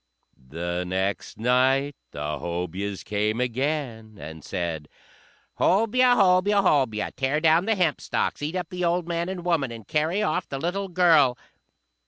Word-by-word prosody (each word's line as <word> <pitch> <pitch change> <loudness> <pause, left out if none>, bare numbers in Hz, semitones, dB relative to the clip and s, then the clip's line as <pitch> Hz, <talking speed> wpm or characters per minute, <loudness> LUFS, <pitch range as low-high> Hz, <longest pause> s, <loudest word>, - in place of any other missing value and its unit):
The 85 +4 -3
next 95 +2 -3
night 130 +4 +2
the 75 0 -4
Hobyahs 90 +3 -4
came 105 +2 -1
again, 125 -4 -3
and 80 +1 -9
said, 85 -5 -4 0.7
"Hobyah! 245 +5 +3
Hobyah! 195 +1 +4
Hobyah! 130 - +1
Tear 135 +3 0
down 165 +2 +3
the 225 0 +2
hempstalks, 170 -6 -1
eat 150 +4 -3
up 180 -3 -3
the 180 0 -4
old 175 0 0
man 170 +1 -2
and 180 -2 -6
woman, 160 -8 0
and 115 -3 -10
carry 160 +7 0
off 155 - -1
the 135 - -4
little 180 +7 -2
girl!" 165 -8 +4
140 Hz, 145 wpm, -25 LUFS, -, 0.7 s, Hobyah